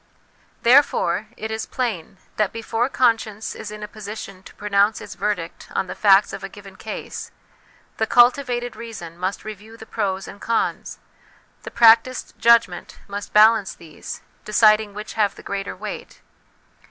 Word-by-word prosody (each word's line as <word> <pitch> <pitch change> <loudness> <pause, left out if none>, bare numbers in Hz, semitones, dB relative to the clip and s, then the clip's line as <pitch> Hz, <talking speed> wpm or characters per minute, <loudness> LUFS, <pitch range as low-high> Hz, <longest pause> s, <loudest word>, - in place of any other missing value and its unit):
Therefore, 235 -6 +4
it 220 +1 -5
is 220 0 -4
plain 205 -8 -3 0.2
that 210 -2 +1
before 230 +2 -2
conscience 225 -5 0
is 220 - -8
in 210 0 -8
a - - -5
position 210 -3 -8
to - - -15
pronounce 205 +1 +2
its 210 -1 -9
verdict 190 -3 -4
on - - +1
the 180 - -6
facts 200 -1 +4
of - - -7
a 195 - -5
given 195 -1 -13
case, 220 +2 -7 0.7
the 220 - 0
cultivated 245 0 +3
reason 210 -8 -8
must 185 +4 -4
review 215 +1 -9
the 220 - -11
pros 195 -4 -3
and 200 - -11
cons; 230 -1 -1 0.6
the - - -8
practised 230 +2 +4
judgment 230 -6 +3
must 200 0 -6
balance 215 -1 +5
these, 160 -3 -10 0.2
deciding 215 -1 +3
which 210 +1 -7
have 205 -2 +1
the - - -13
greater 200 0 -4
weight. - - -8
215 Hz, 155 wpm, -22 LUFS, 200-225 Hz, 0.7 s, balance